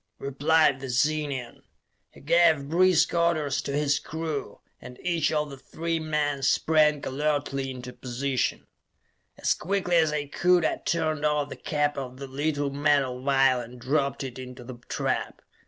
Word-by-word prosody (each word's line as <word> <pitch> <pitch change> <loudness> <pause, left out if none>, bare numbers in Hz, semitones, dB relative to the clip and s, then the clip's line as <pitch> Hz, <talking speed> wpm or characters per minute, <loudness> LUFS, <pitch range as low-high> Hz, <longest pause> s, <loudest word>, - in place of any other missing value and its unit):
replied 145 +1 +2
the 135 -1 -6
Zenian. 140 -1 -1 0.5
He - - -17
gave 160 -2 +3
brisk 180 +2 +4
orders 170 -5 +1
to - - -5
his 145 0 +1
crew, 160 -2 -5 0.2
and 125 - -10
each 170 -4 +1
of 150 -2 -1
the 135 - -8
three 165 +4 -3
men 150 -3 -1
sprang 150 +1 +3
alertly 140 -1 -1
into 125 -1 -7
position. 130 0 -2 0.7
As - - +2
quickly 180 0 0
as 160 -2 +3
I 150 -1 -2
could, 175 +4 +2
I - - 0
turned 155 -3 -1
off 150 -1 +1
the - - -6
cap 145 -1 -1
of 130 -1 -7
the 140 - -6
little 145 +1 -2
metal 140 -3 +1
vial 135 -1 +3
and 120 +1 -11
dropped 140 +2 0
it 130 -1 -7
into 125 -1 -9
the 120 0 -9
trap. - - -2
145 Hz, 155 wpm, -26 LUFS, 135-155 Hz, 0.7 s, brisk